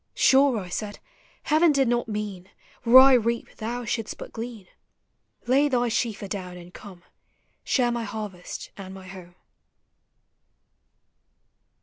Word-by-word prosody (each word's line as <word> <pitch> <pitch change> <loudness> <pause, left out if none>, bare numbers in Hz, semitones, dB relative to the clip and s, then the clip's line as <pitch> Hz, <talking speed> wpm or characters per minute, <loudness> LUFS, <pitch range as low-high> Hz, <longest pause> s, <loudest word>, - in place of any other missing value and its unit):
Sure, 270 -2 +4
I 190 -4 -5
said, 205 +3 -5 0.5
Heaven 310 +2 +4
did 275 -3 +2
not 240 0 0
mean 210 -4 -5 0.3
Where 240 +2 +7
I 265 +1 +9
reap 235 -1 0
thou 235 +2 -4
shouldst 225 -1 -3
but - - -10
glean; 225 -4 -7 0.8
Lay 270 +4 +3
thy 245 -2 +1
sheaf 225 -2 -2
adown 185 -2 -6
and 175 0 -13
come, 185 -5 -12 0.6
Share 245 -3 +1
my 235 -1 -2
harvest 205 -5 -7
and 190 -1 -9
my 190 -1 -11
home. 180 -2 -12
225 Hz, 130 wpm, -25 LUFS, 190-245 Hz, 0.8 s, I